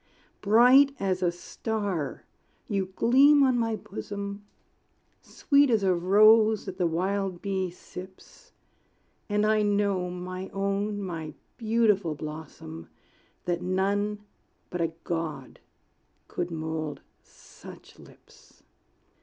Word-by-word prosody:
Bright 250 +7 +6
as 190 -1 -1
a 175 -1 +2
star 190 - -4 0.4
you 195 -4 -1
gleam 280 +4 +5
on 260 -2 +3
my 225 -1 0
bosom, 200 - -7 0.8
Sweet 285 -1 +2
as 220 -4 +2
a 190 -1 +3
rose 215 +4 +5
that 190 -1 -7
the 175 - +2
wild 185 +2 -2
bee 190 -2 -2
sips; 185 +1 -13 0.8
And 210 +1 +1
I 215 0 +3
know, 200 -3 +1
my 185 +1 -6
own, 200 +1 -1
my 165 -5 -6 0.2
beautiful 215 -7 +1
blossom, 150 - -9 0.6
That 175 -1 -1
none 200 +3 -1 0.5
but 180 - -3
a 165 -1 0
God 165 -2 -4 0.7
could 175 0 -4
mould 160 -2 -4 0.2
such - - -15
lips. - - -20
195 Hz, 110 wpm, -27 LUFS, 175-215 Hz, 0.8 s, Bright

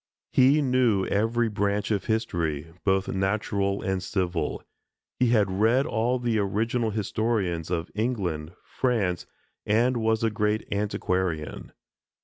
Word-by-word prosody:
He 140 +4 +5
knew 125 -7 +2
every 115 +3 +1
branch 105 0 -1
of 100 -2 0
history, 85 -9 -1
both 95 -1 +2
natural 100 0 -1
and 95 -1 -1
civil; 90 -6 -2 0.6
he 125 - +4
had 105 -5 +3
read 115 +8 +3
all 120 -2 0
the 120 -3 0
original 110 +4 0
historians 105 -5 -1
of 85 -2 -2
England, 95 -9 -2
France, 105 -9 -1 0.4
and 120 +4 +2
was 110 0 +1
a 115 - +2
great 105 0 0
antiquarian. 95 -6 -2
105 Hz, 125 wpm, -26 LUFS, 95-115 Hz, 0.6 s, He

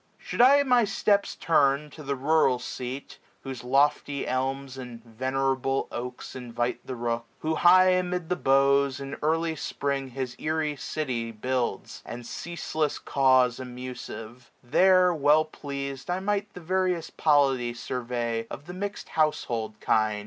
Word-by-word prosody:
Should - - -2
I 280 +3 +7
my 250 -3 +4
steps 200 -1 +1
turn 145 -2 +2
to 155 - -11
the 140 -1 -2
rural 140 -1 +3
seat. 125 +2 -6 0.2
Whose 135 -3 -7
lofty 140 +2 +1
elms, 135 +1 -2
and 125 -3 -9
venerable 130 +3 -1
oaks. 125 +2 -6
Invite 120 -1 -3
the 130 - -4
rook; 115 0 -2
who 160 +1 0
high 185 +3 +6
amid 180 -2 0
the 180 - 0
boughs, 140 -2 +3
765 140 0 -6
In - - -7
early 160 +1 +1
Spring, 140 -2 -2
his 130 -1 -5
airy 155 -1 -1
city 125 -6 -3
builds. 125 +2 -3
And 120 0 -8
ceaseless 160 0 -3
caws 130 -3 +3
amusive; 125 -2 -8
there, 185 +7 +5
well 150 0 +4
pleas'd, 140 -1 -6
I 180 +1 0
might 205 +1 -1
the 180 - -8
various 180 -1 0
polity 135 -6 +2
survey 120 -2 -3
Of 145 - -8
the 180 - -8
mix'd 200 +2 -5
houshold 120 -9 -1
kind. 110 -1 +2
135 Hz, 145 wpm, -27 LUFS, 125-160 Hz, 0.2 s, I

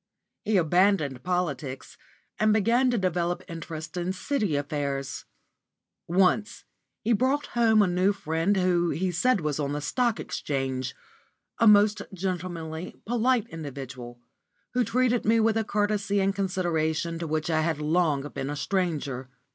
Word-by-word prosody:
He 215 -2 +2
abandoned 175 -5 +2
politics 150 -8 -3 0.4
and 215 0 +4
began 230 +5 +3
to 245 - +1
develop 175 -2 -1
interest 160 -1 -7
in 175 +1 -1
City 210 - -1
affairs. 140 -1 -3 0.8
Once 190 +4 +2 0.4
he 230 +2 +2
brought 265 +6 +1
home 225 -3 +4
a - - +2
new 180 +2 +2
friend 165 +1 0
who 175 -2 +2
he 185 +3 -1
said 220 +4 +2
was 150 -1 -2
on 145 -1 -1
the 145 - -2
Stock 235 - 0
Exchange 130 -2 -3 0.6
a 230 - +5
most 210 0 +6
gentlemanly, 175 -2 -4
polite 240 0 +1
individual, 130 -6 -8 0.5
who 250 0 +2
treated 245 +1 +1
me 225 +2 +3
with 220 0 +3
a 225 - +1
courtesy 205 -1 0
and 195 0 +2
consideration 170 -4 -1
to 170 - -3
which 155 +1 -1
I 155 -1 +2
had 160 -1 0
long 150 -2 +1
been 135 - -4
a 145 - -3
stranger. 145 -8 -2
180 Hz, 145 wpm, -27 LUFS, 155-210 Hz, 0.8 s, most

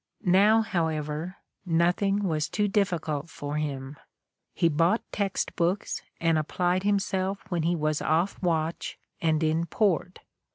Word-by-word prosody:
Now, 210 +4 +5
however, 160 -2 -2 0.3
nothing 180 +4 +2
was 155 -5 0
too 210 -1 +1
difScult 170 -7 -1
for 145 0 -5
him. 140 -2 -4 0.6
He 170 - +3
bought 165 +7 +2
text 200 -2 -2
books 180 +3 0 0.2
and 165 -2 +2
applied 180 +4 0
himself 195 -1 0
when 175 -2 0
he 170 +2 +1
was 155 -2 0
off 170 +5 0
watch 165 -2 -1 0.2
and 160 -1 +2
in 160 +2 +1
port. 180 -1 0
170 Hz, 130 wpm, -27 LUFS, 155-195 Hz, 0.6 s, Now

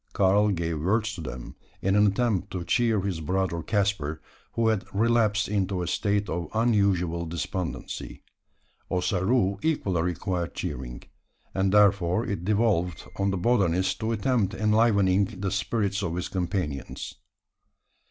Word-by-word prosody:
Karl 100 +2 +4
gave 85 -4 -1
words 110 +5 +1
to 95 - -7
them, 65 -4 -7 0.2
in 95 +1 +1
an 105 0 +5
attempt 100 -2 0
to 90 -2 -4
cheer 115 +2 +2
his 90 -4 -3
brother 90 +1 -1
Caspar 95 -6 -1 0.3
who 115 -1 +2
had 110 -3 0
relapsed 110 -1 +2
into 95 -3 -1
a - - -4
state 100 +3 0
of 85 0 -3
unusual 100 -7 +1
despondency. 85 +1 -5 0.7
Ossaroo 95 +3 +1
equally 100 - 0
required 90 0 -2
cheering; - - -5 0.5
and 95 0 +1
therefore 100 0 +3
it 100 -4 -3
devolved 100 -4 +1
on 100 0 +1
the 95 - -1
botanist 95 -3 +1
to 110 +1 -1
attempt 110 -2 0
enlivening 105 -3 +3
the 95 -1 -2
spirits 105 -3 -1
of 85 -4 -2
his 90 - -3
companions. 90 -6 -3
95 Hz, 135 wpm, -26 LUFS, 90-105 Hz, 0.7 s, an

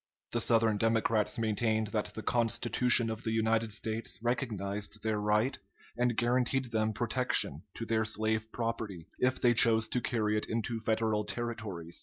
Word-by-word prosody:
The - - 0
Southern 115 -2 +3
Democrats 115 -1 +1
maintained 110 -1 0
that 105 0 -3
the 110 - -6
Constitution 120 0 +2
of 110 0 -5
the 110 - -1
United 110 0 +1
States 110 +2 -2
recognized 105 -4 -2
their 110 -1 0
right 105 +5 +1 0.4
and 120 -1 0
guaranteed 125 +1 +1
them 110 -1 +1
protection 120 +3 0
to 115 - -5
their 110 -1 +1
slave 110 0 -1
property, 110 -7 -4
if 130 +1 +1
they 120 -1 +4
chose 110 -1 +5
to 125 - -1
carry 105 -3 0
it - - -4
into 115 +1 -2
Federal 110 -1 0
Territories. 105 -8 -5
110 Hz, 155 wpm, -31 LUFS, 110-120 Hz, 0.4 s, chose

